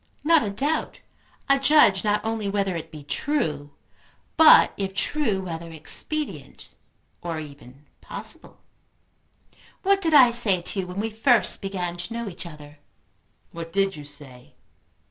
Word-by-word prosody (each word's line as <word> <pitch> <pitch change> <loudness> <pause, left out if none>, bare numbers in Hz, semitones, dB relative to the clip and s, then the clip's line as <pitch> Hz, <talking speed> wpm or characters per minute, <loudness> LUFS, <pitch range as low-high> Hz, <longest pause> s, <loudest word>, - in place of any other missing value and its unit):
"Not 325 0 +4
a 210 - -2
doubt; 280 +11 -2 0.5
a 275 0 +3
judge 270 -9 +4
not 210 0 0
only 220 -2 -2
whether 195 -2 -1
it 165 -1 -6
be 150 -2 -11
true, 145 - -2 0.7
but 320 -1 +7
if 195 -1 -4
true 220 -7 -1
whether 170 -2 -6
expedient, 290 - -3 0.5
or 165 -2 -4
even 140 -2 -13 0.2
possible. - - -6 1.3
What 395 0 +2
did 325 -4 +2
I 255 -4 +8
say 225 -6 +2
to 195 - -4
you 185 - -3
when 180 +2 -6
we 220 +2 -2
first 225 +2 +3
began 180 -3 -4
to 175 +6 -7
know 235 -1 -4
each 175 -2 -8
other?" 150 -2 -13 0.7
"What 165 0 -8
did 195 -1 0
you 150 - -9
say?" 135 -4 -14
195 Hz, 145 wpm, -24 LUFS, 165-235 Hz, 1.3 s, I